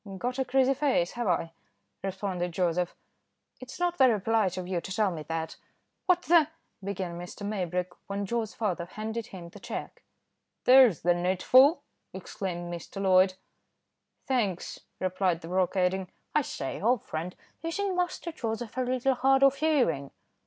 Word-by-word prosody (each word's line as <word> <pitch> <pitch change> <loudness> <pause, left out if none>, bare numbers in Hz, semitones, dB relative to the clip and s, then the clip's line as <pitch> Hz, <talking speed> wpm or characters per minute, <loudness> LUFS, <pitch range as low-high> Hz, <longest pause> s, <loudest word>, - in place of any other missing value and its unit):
"Got 250 +6 -3
a - - +3
greasy 265 +1 +3
face, 260 -11 +1
have 240 -2 -3
I?" 165 -2 0 0.5
responded 190 -2 -3
Joseph. 175 0 0 0.6
"It's 255 +5 -10
not 350 -1 0
very 245 -5 +5
polite 205 -3 +1
of 180 -1 -4
you 180 -2 -1
to 190 - -8
tell 205 0 +1
me 160 -3 -5
that." 160 0 -3 0.5
"What 355 -1 +3
the 330 -3 +5 0.2
" - - -31
began 185 -3 -4
Mr. 180 +3 -7
Maybrick, 180 -3 -2 0.2
when 200 0 -3
Joe's 225 +1 -2
father 185 -6 -1
handed 220 +4 -5
him 180 -6 -9
the - - -13
cheque. - - -6 0.6
"There's 250 - +7
the 175 +1 +4
needful," 190 - +4 0.3
exclaimed 175 -2 -5
Mr. 170 +3 -7
Loyd. 185 -1 +4 0.9
"Thanks," 210 -9 -1 0.2
replied 185 -2 0
the 165 - -8
broker, 185 +1 +1
adding, 185 0 +1 0.2
"I 300 - +4
say, 135 - -5
old 235 +1 +2
friend 165 +3 -4 0.3
isn't 370 +4 -2
Master 355 -1 -2
Joseph 230 -5 -4
a - - +2
little 255 +1 +1
hard 270 +2 +3
of 275 0 +5
hearing?" 245 - +1
200 Hz, 160 wpm, -28 LUFS, 180-255 Hz, 0.9 s, There's